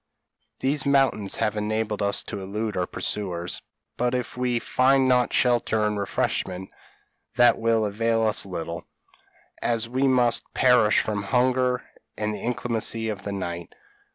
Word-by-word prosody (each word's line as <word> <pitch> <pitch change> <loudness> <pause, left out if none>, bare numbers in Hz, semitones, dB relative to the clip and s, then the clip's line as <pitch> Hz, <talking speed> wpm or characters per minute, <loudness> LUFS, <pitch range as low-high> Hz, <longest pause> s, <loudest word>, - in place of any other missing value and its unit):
These 135 +1 +1
mountains 135 -8 +2
have 110 -2 0
enabled 105 0 -1
us 100 0 0
to 100 -3 -6
elude 105 +3 -3
our 90 -1 -1
pursuers; 90 -4 -3 0.4
but 125 +1 0
if 125 -2 -3
we 125 -1 0
find 130 +3 +3
not 125 -1 +3
shelter 120 -3 +2
and 105 -1 -1
refreshment, 95 -1 -2 0.6
that 120 -1 +5
will 115 -1 +2
avail 115 +2 0
us 110 -1 +1
little, 85 -3 -6 0.7
as 115 -1 0
we 130 +3 +1
must 125 -2 +2
perish 120 -5 +5
from 105 -2 -2
hunger 125 +3 +1 0.3
and 105 0 -1
the - - -6
inclemency 115 -2 -1
of 105 -3 -4
the 100 - -5
night. 85 -3 -5
110 Hz, 145 wpm, -25 LUFS, 100-125 Hz, 0.7 s, that